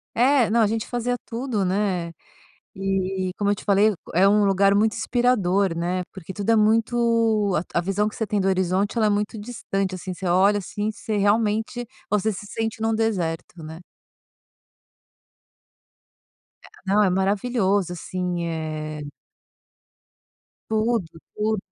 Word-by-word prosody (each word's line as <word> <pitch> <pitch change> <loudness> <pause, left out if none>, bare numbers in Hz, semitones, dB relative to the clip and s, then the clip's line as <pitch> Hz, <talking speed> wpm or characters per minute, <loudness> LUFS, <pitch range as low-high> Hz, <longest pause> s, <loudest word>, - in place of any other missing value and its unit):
É, 250 -1 +4
não. 230 +1 +3
A 220 - +5
gente 220 +1 -2
fazia 245 0 -1
tudo, 230 -4 -2
né. 185 -3 -1 0.6
E, 190 -1 -1
como 205 -1 0
eu - - +1
te - - -11
falei, 205 +2 +4 0.2
é 185 +4 +5
um 205 +1 +4
lugar 195 0 +3
muito 215 +1 +3
inspirador, 200 -6 +1
né, 180 +2 -1
porque 190 -1 -8
tudo 205 +2 -1
é - - +5
muito 225 -2 +2 0.2
a - - +2
a - - 0
visão 195 +3 0
que 215 - -6
você 220 - -2
tem 205 +1 0
do 190 - +1
horizonte, 190 +2 +1
ela 220 -2 +3
é - - +2
muito 210 +2 -1
distante, 195 -4 -3
assim, 185 0 -6
você 185 +1 -5
olha, 195 +4 +4
assim, 205 +2 -3
você 215 0 -4
realmente 220 +3 +1 0.2
você 210 +1 +1
se 205 +1 -7
sente 225 +1 -4
num 225 0 +1
deserto 180 -7 -2
né. 160 +1 -8 2.9
É. - - -13 0.2
Não, 200 +2 +3
é 195 - +3
maravilhoso, 195 0 +1
assim, 180 0 -3
eh 155 -2 -4 1.6
Tudo, 220 -3 +1 0.3
tudo. 215 0 0
205 Hz, 150 wpm, -23 LUFS, 185-220 Hz, 2.9 s, A